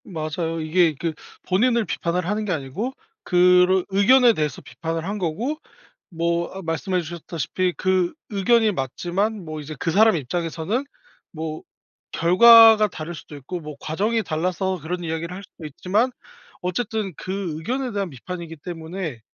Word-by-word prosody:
맞아요. 165 -1 -3
이게 160 0 +2
그 165 -2 -1 0.3
본인을 230 +4 +2
비판을 175 -1 -2
하는 210 +3 -1
게 200 - -2
아니고 165 - -3 0.3
그런 180 0 +4
의견에 235 +5 +5
대해서 150 -7 -2
비판을 165 0 -5
한 205 +3 -3
거고 210 - -2 0.5
뭐 170 0 -1
아 190 - -6
말씀해 175 +3 -1
주셨다시피 170 +2 -3
그 185 -2 +1 0.2
의견이 220 +2 +3
맞지만 185 - -2
뭐 155 -1 -6
이제 150 +1 -7
그 165 - 0
사람 220 +3 +5
입장에서는 165 - -2 0.5
뭐 155 -1 -5 0.5
결과가 220 +5 +8
다를 170 -2 -7
수도 145 +1 -11
있고 160 +6 -6
뭐 150 -1 -8
과정이 210 +10 0
달라서 180 +3 -1
그런 175 +3 -4
이야기를 165 +1 -3
할 195 - -8
수도 170 -4 -13
있지만 195 - 0 0.5
어쨌든 200 +1 -2
그 185 -4 -4
의견에 250 +10 -2
대한 200 -3 -2
비판이기 165 +4 -8
때문에 165 -4 -6
180 Hz, 325 characters per minute, -23 LUFS, 160-200 Hz, 0.5 s, 결과가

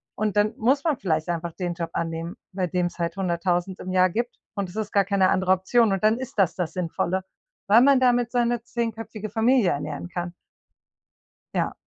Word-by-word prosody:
und 210 -1 -1
dann 210 +1 +2
muss 265 +5 +2
man 310 -6 +1
vielleicht 160 -4 -1
einfach 170 -1 -3
den 175 -1 -3
Job 165 0 -4
annehmen, 165 +1 -3 0.2
bei 185 -1 -1
dem 175 +1 0
es 175 - -10
halt 170 0 -2
100.000 180 0 -1
im 185 - -5
Jahr 185 0 +4
gibt 235 +6 -3 0.2
und 200 -2 -2
es 175 - -13
ist 215 -1 -3
gar 200 -1 +3
keine 195 -2 +3
andere 185 0 +2
Option 200 +3 +2
und 195 - -2
dann 215 +2 +4
ist 260 -4 -7
das 190 -4 +3
das 180 -3 -3
Sinnvolle, 180 +1 -1 0.4
weil 215 +4 +7
man 275 0 +6
damit 245 -2 +3
seine 240 -1 +1
10- 235 -1 -2
köpfige 215 -1 -7
Familie 225 -1 +3
ernähren 145 +3 -4
kann. 175 -1 -4 1.2
Ja. - - 0
190 Hz, 200 wpm, -25 LUFS, 175-225 Hz, 1.2 s, weil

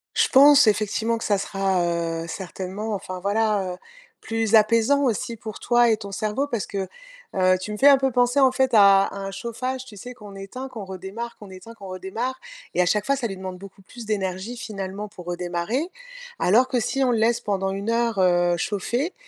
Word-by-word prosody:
Je - - +3
pense, 280 -1 +7
effectivement, 215 +2 +1
que 225 - -6
ça 205 - +2
sera, 195 -2 0
heu, 165 -1 -2
certainement, 190 +5 -5
enfin, 185 -2 -5
voilà, 200 -1 0
heu, - - -10 0.4
plus 225 -1 +1
apaisant 230 +6 +4
aussi 235 -1 -1
pour 215 -1 -8
toi 240 -1 +3
et 220 - +3
ton 200 -2 -8
cerveau 215 +7 -1
parce 235 -7 -2
que, 195 -2 -4 0.5
heu, 185 -1 +3
tu 210 - -5
me 210 - -4
fais 275 - +5
un 280 -1 +8
peu 265 0 0
penser, 245 +2 +2
en 265 -2 +5
fait, 260 0 +1
à 200 -2 +6
un 195 0 -5
chauffage, 255 +5 -4
tu 225 - -13
sais, 245 +6 -8
qu'on 205 -3 -12
éteint, 195 +7 -7
qu'on 235 -5 -8
redémarre, 190 +5 -7
qu'on 205 - -12
éteint, 185 +5 -11
qu'on 200 -3 -11
redémarre. 205 +8 -4 0.3
Et - - +2
à - - +3
chaque 210 +3 +1
fois, 275 - +2
ça 255 -3 -2
lui 195 -3 -7
demande 185 -1 -6
beaucoup 195 0 -13
plus 235 +4 -11
d'énergie, 195 +2 -3
finalement, 200 -3 -6
pour 185 -4 -12
redémarrer. 175 - -2 0.5
Alors 235 +8 +4
que 255 -1 0
si 270 +4 0
on 255 - +2
le 235 - +1
laisse 230 +1 +2
pendant 195 -2 -1
1 200 +3 -4
heure, 230 -2 0
heu, 175 -1 +3
chauffer 240 - -2
210 Hz, 210 wpm, -23 LUFS, 190-240 Hz, 0.5 s, un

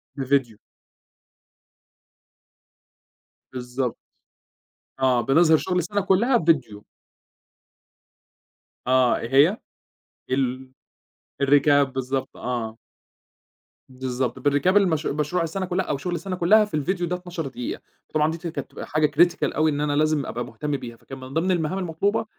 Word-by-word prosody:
بفيديو. 135 -5 0 3.0
بالضبط. 125 0 -3 1.0
آه 130 -2 +3
بنظهِر 160 +4 +4
شغل 180 +2 -2
السنة 200 +4 0
كُلها 210 +7 +3
بفيديو. 130 - 0 2.0
آه 130 -1 +4
إيه 115 - -5 0.2
هي؟ 215 - -5 0.7
ال 130 0 -1 0.7
الRecap 145 +1 +5
بالضبط 130 0 -3
آه. 115 -3 -4 1.1
بالضبط. 130 -1 -3
بrecap 145 +5 +1
المش 165 -6 +2
مشروع 150 +4 -1
السنة 185 +4 -3
كُلها 180 +1 -1
أو 145 - -2
شغل 175 +5 -3
السنة 185 +1 -4
كُلها 210 +5 +5
في 205 - -17
الفيديو 175 +4 -1
ده 180 - -1
12 175 -4 -6
دقيقة، 125 -2 -5 0.3
وطبعًا 155 0 +1
دي 165 - -5
ت 170 - -6
كانت 165 - -5
بتبقى - - -9
حاجة 155 0 +1
critical 175 +2 +5 0.2
أوي 155 0 +2
إن 145 0 -2
أنا 145 -1 0
لازم 155 -2 +1
أبقى 120 +1 -4
مهتم 140 +5 -3
بيها 120 -3 -9
فكان 135 - -10
من 130 - -9
ضمن 175 +4 +1
المهام 175 +1 0
المطلوبة 185 +5 -1
150 Hz, 130 wpm, -24 LUFS, 130-175 Hz, 3.0 s, الRecap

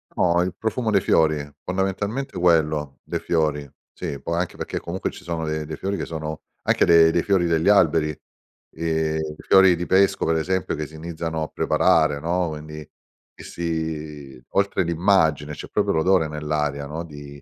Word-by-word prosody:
No, 85 -1 +3
il 90 0 -2
profumo 110 +1 -1
dei 100 -3 +3
fiori, 75 -4 +2 0.2
fondamentalmente 95 +8 -2
quello, 75 -5 +1
dei - - -3
fiori 75 -4 -1 0.2
sì, 70 - -5
poi 85 0 -2
anche 90 - -3
perché - - -4
comunque 90 +3 -4
ci - - -12
sono 85 -2 -3
de 75 0 -2
dei 80 +1 -6
fiori 100 +1 -3
che - - -3
sono 80 -1 -5 0.2
anche - - +3
de 85 -1 +6
dei 85 - +1
fiori 95 -3 +2
degli 80 +1 +1
alberi, 80 -6 +4 0.6
ehm, 80 -1 -1 0.2
i - - -13
fiori 95 -2 +6
di 85 +1 -4
pesco 95 +1 +3
per 80 - +2
esempio 95 +2 -1
che 75 0 -4
si 80 - -14
iniziano 80 0 -4
a - - -3
preparare 80 -3 +2
no, 85 +3 0
quindi, 75 0 -8 0.5
che - - -13
si 80 -5 -5
oltre 100 -1 +1
l'immagine 80 -4 +2
c'è 70 - -8
proprio - - +1
l'odore 85 0 +3
nell'aria 75 -2 -2
no, 80 +3 -5
di 70 -3 -11
80 Hz, 175 wpm, -23 LUFS, 75-90 Hz, 0.6 s, de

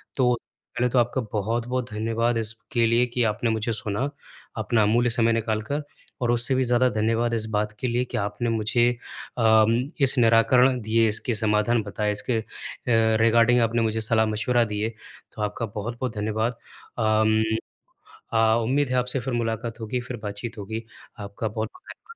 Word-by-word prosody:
तो, 125 -2 +3 0.4
पहले 125 +1 +1
तो 125 - +2
आपका 120 +2 +1
बहुत-बहुत 120 +4 -2
धन्यवाद 115 +2 0
इसके 115 +2 -1
लिए 120 +2 +3
कि 125 0 -1
आपने 110 +1 0
मुझे 110 +1 -1
सुना, 105 +5 -2 0.5
अपना 110 +1 +1
अमूल्य 120 +4 +3
समय 115 0 +2
निकाल 110 -1 -1
कर 150 +1 -1 0.4
और 120 -1 +2
उससे 120 +2 +1
भी 130 - +2
ज़्यादा 125 +1 +3
धन्यवाद 115 +1 0
इस 110 -2 -1
बात 105 0 0
के 130 - -1
लिए 120 +1 0
कि 125 - -5
आपने 105 +3 -2
मुझे 115 +2 +2 0.5
अम, 110 -1 +4 0.3
इस 135 0 +5
निराकरण 125 +2 +4
दिए, 115 +1 +2
इसके 110 +2 -1
समाधान 110 +2 +2
बताए, 105 +1 -2
इसके 110 +3 -1
अ, 110 - -8 0.8
रिगार्डिंग 115 +2 +4
आपने 115 +1 +1
मुझे 110 0 0
सलाह-मशवरा 110 +2 +2
दिए। 105 +2 -1 0.4
तो 110 - -8
आपका 105 +2 -2
बहुत-बहुत 115 +4 -5
धन्यवाद। 110 +3 -1 0.4
अम 110 -1 +3 0.9
अ, 110 0 +4
उम्मीद 135 +4 +1
है 130 - 0
आपसे 125 +1 0
फ़िर 125 +1 -4
मुलाकात 115 0 -2
होगी, 115 +3 -3
फ़िर 120 0 -6
बातचीत 105 +3 -6
होगी, 110 +3 -5 0.4
आपका 100 +2 -4
बहुत-बहुत 110 - -8
115 Hz, 165 wpm, -24 LUFS, 110-120 Hz, 0.9 s, इस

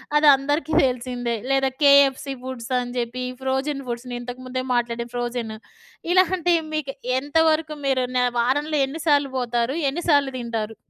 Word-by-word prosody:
అది 295 0 +5
అందరికీ 290 +3 -2
తెలిసిందే. 245 -1 -2
లేదా 270 0 +2
కేఎఫ్‌సి 280 -1 +5
ఫుడ్సని 250 -1 -3
జెప్పి, 245 +1 -3 0.2
ఫ్రోజిన్ 270 +2 -2
ఫుడ్స్‌ని 245 +1 -5
ఇంతకుముందే 255 +1 -5
మాట్లాడాం 235 0 -1
ఫ్రోజిను. 240 -2 -3 0.5
ఇలాంటి 370 -1 +3 0.2
మీకు 285 -3 -2 0.3
ఎంతవరకు 310 +2 +1
మీరు 260 -2 +1
న 250 - +3 0.2
వారంలో 290 +5 +1
ఎన్ని 315 +4 -6
సార్లు 285 -2 +3
బోతారు? 240 +1 -1
ఎన్ని 335 +6 -4
సార్లు 280 -2 +3
దింటారు? 225 -2 -4
260 Hz, 130 wpm, -23 LUFS, 245-290 Hz, 0.5 s, అది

